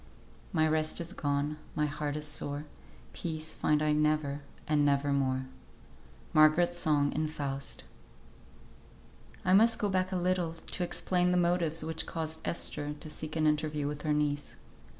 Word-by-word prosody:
"My 160 -4 +3
rest 155 0 0
is 170 +2 -5
gone, 145 -1 -1 0.2
My 150 - +2
heart 145 0 -2
is 150 0 -3
sore, 145 0 -3 0.5
Peace 160 -2 -4
find 150 0 +2
I 155 - +3
never, 150 -1 +1 0.3
And 150 -1 +3
never 140 0 +2
more." 130 -1 +1 0.9
MARGARET'S 155 +3 +5
SONG 150 -4 +2
IN 155 0 0
"FAUST." 140 -3 -4 1.6
I 185 - +4
must 225 +3 +6
go 205 - 0
back 185 -1 +1
a - - -1
little 180 -2 +1
to 165 +2 -5
explain 180 0 +1
the 180 - +3
motives 170 -2 +1
which 160 0 -3
caused 160 -1 -3
Esther 150 -3 -3
to 155 - -8
seek 155 0 -6
an 155 -1 +2
interview 150 -1 +1
with 145 0 -4
her 155 - 0
niece. 145 -1 0
155 Hz, 155 wpm, -31 LUFS, 145-170 Hz, 1.6 s, must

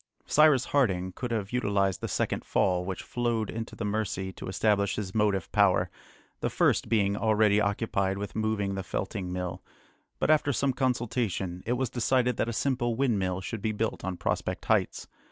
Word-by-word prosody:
Cyrus 150 -4 +5
Harding 95 -10 +1
could 125 +6 -5
have 105 -4 -2
utilised 100 -6 +1
the - - -2
second - - -1
fall 90 -1 +1
which 95 0 -5
flowed 120 -3 -1
into 115 0 -6
the 110 - -4
Mercy 100 -3 -2
to - - -8
establish 100 +1 +1
his 100 -3 -4
motive 105 -4 +1
power, - - +3 0.5
the - - -1
first - - +2
being 100 -3 +2
already 105 -1 +3
occupied 100 -2 0
with 100 0 -5
moving 110 -2 0
the 95 - -3
felting 95 0 -4
mill; 90 -1 -4 0.6
but - - +2
after 150 -2 +3
some 140 +1 +1
consultation, 115 -8 -1
it 120 - +2
was 125 -1 -1
decided 125 0 +1
that 115 - 0
a - - -1
simple 120 -1 0
windmill 100 -8 0
should 110 +3 -5
be 110 +1 -1
built 110 +1 -2
on 95 -1 -3
Prospect - - -2
Heights. - - +1
105 Hz, 175 wpm, -28 LUFS, 95-120 Hz, 0.6 s, Cyrus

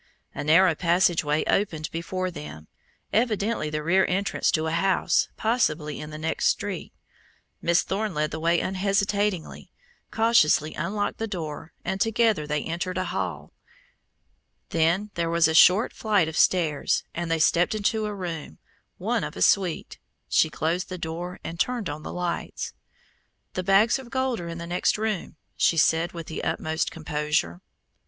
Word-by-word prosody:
A 145 - -4
narrow 165 +4 +5
passageway 170 -3 +2
opened 160 -6 0
before 185 +2 -3
them 75 - -9 0.5
evidently 215 -6 +1
the 150 0 -3
rear 185 +4 +3
entrance 195 +2 0
to 160 -1 +1
a 160 - -1
house 185 +1 +2
possibly 165 -10 0
in 150 - -7
the 155 - -7
next 160 +1 -1
street. 200 -4 -2 0.7
Miss 170 +1 +3
Thorne 200 -1 -2
led 150 0 0
the 160 - -4
way 170 +1 +2
unhesitatingly, 195 -1 -1 0.4
cautiously 190 -9 +3
unlocked 205 +1 -2
the 225 - -2
door, 160 -5 -6
and 190 +1 -2
together 225 -8 +2
they 150 0 -1
entered 175 +3 -3
a 185 - 0
hall. - - -4 1.2
Then 170 +6 +1
there 170 -1 -1
was 170 -1 +4
a 160 - 0
short 185 +7 +6
flight 205 -7 +1
of 160 - -5
stairs, 160 -6 +2
and 170 0 -3
they 165 - +2
stepped 170 +5 +3
into 215 +1 0
a 210 - -4
room, 165 - -6 0.4
one - - -1
of - - -5
a - - -6
suite. 185 - +1 0.3
She 160 - +3
closed 165 +4 -2
the 185 - -5
door 170 +2 -5
and 165 +1 -6
turned 235 -10 -1
on 150 +1 -7
the - - -7
lights. 175 -1 -4 0.8
"The 185 - -2
bags 195 +7 +4
of 260 -3 -11
gold 260 -1 -1
are 170 - -6
in 165 0 -6
the 170 - -6
next 175 +4 +1
room," 215 -6 -3 0.2
she 165 - +2
said 165 +2 +3
with 170 -2 -7
the 160 - -6
utmost 160 0 -1
composure. 150 - -1
Mr. - - -50
175 Hz, 165 wpm, -25 LUFS, 160-200 Hz, 1.2 s, short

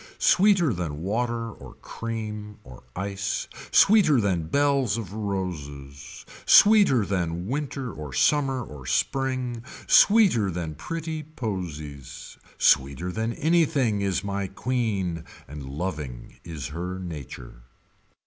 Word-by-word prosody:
Sweeter 185 - +4
than 80 -4 -4
water 115 +3 -2
or - - -13
cream 105 -2 -6
or 65 -2 -13
ice. 95 0 -3 0.2
Sweeter 190 - +5
than 90 -7 0
bells 140 - +1
of 100 -4 -6
roses. 75 -10 -6 0.2
Sweeter 205 - +6
than 90 -3 -2
winter 135 -1 -4
or 75 -3 -8
summer 135 - +2
or 70 - -11
spring. 125 - -1 0.2
Sweeter 195 - +5
than 85 -3 -4
pretty 160 - -5
posies. 80 - -7 0.2
Sweeter 70 +6 +2
than 110 +4 -2
anything 145 -10 +1
is 100 -1 -1
my 100 -1 -2
queen 100 -6 -2 0.2
and 75 0 -8
loving 75 -5 -6
is 75 -5 -6
her 90 +4 -5
nature. 70 -9 -8
100 Hz, 110 wpm, -25 LUFS, 80-130 Hz, 0.2 s, Sweeter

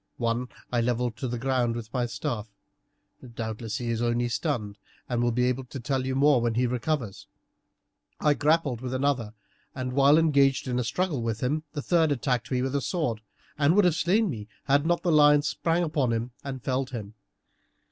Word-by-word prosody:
One 120 +1 -1 0.2
I 120 -1 +2
levelled 120 0 0
to 130 - -3
the 120 0 -3
ground 125 -2 0
with 115 -2 -7
my 125 -2 0
staff; 115 -3 -4 0.9
doubtless 110 -1 -4
he 120 -1 -2
is 115 0 -1
only 120 0 +1
stunned 110 -6 -2 0.3
and 120 -1 -1
will 120 0 +2
be 125 +2 +1
able 125 +1 -1
to 135 +2 -8
tell 130 +1 -1
you 130 - -1
more 140 -2 +4
when 115 -1 0
he 125 +1 +2
recovers. 125 -3 -2 0.9
I 150 - +3
grappled 145 -5 +1
with 130 0 -3
another, 130 -5 -1 0.4
and 130 -1 -3
while 140 +2 +5
engaged 140 -5 +3
in 125 -1 0
a - - 0
struggle 155 +2 -1
with 115 -1 -2
him 150 +5 -1
the 145 -3 -4
third 165 -3 +3
attacked 125 -3 -1
me 125 -1 0
with 135 0 -2
a 140 - +1
sword, 135 - -2 0.4
and 150 +4 +4
would 205 -2 +5
have 175 - +4
slain 195 +7 +2
me 110 - -5 0.2
had 145 +2 +2
not 175 0 +1
the 175 - +2
lion 150 -1 +6
sprang 165 +3 0
upon 150 -6 0
him 115 +2 -2
and 135 -3 -6
felled 130 0 -1
him. 110 -5 -7
130 Hz, 200 wpm, -27 LUFS, 120-145 Hz, 0.9 s, lion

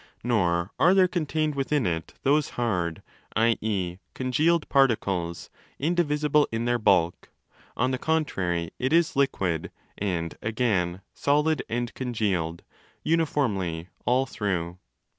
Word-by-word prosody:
* - - -37
Nor 90 -6 +1
are 180 +3 +5
there 190 -1 +6
contained 155 -3 -1
within 140 0 0
it 80 -2 -3
those 145 +2 +3
'hard' 90 -9 -1 0.3
(i.e. 110 -6 +1 0.2
congealed) 150 +6 +1
particles 100 - +1 0.3
'indivisible 150 -2 +2
in 115 +1 -2
their 120 0 +1
bulk': 90 -5 +2 0.5
on 125 +2 +2
the 130 - -2
contrary, 90 - -1
it 130 +2 0
is 170 -1 +3
liquid—and 90 - -2
again, 100 -6 0
solid 150 +1 +2
and 120 +1 -2
congealed—uniformly 100 - -2
all 130 +2 +2
through. 90 -7 -3
115 Hz, 110 wpm, -26 LUFS, 90-145 Hz, 0.5 s, there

